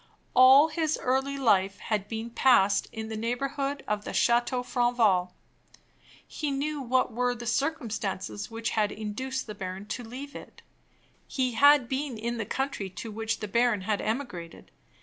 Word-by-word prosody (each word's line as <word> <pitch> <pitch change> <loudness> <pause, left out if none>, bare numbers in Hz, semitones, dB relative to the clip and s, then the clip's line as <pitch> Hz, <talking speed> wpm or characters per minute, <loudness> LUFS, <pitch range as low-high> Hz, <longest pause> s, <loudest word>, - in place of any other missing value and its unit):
All 265 +4 +8
his 315 -1 0
early 270 +2 0
life 200 -6 +2
had 210 -2 -2
been 225 +2 -5
passed 205 -6 +4
in 220 -1 -6
the 220 - -4
neighborhood 275 +5 -2
of 210 -1 -1
the - - -6
Chateau 240 +1 +2
Franval. 230 -8 +1 0.9
He 300 - -3
knew 285 +2 -2
what 255 -1 +1
were 245 +1 0
the 240 0 -8
circumstances 220 -7 -2
which 225 0 -3
had 210 -2 +1
induced 260 +5 -4
the 215 - -7
baron 190 -1 -6
to 245 - -4
leave 265 +5 -8
it. - - -11 0.6
He 255 -2 -1
had 285 +2 +5
been 265 -1 -3
in 235 +2 -3
the 210 - -3
country 265 -8 -3
to 190 +5 -7
which 225 +1 -3
the 210 - -3
baron 235 -1 +2
had 205 +1 -1
emigrated. 215 -9 -5
235 Hz, 160 wpm, -28 LUFS, 210-265 Hz, 0.9 s, All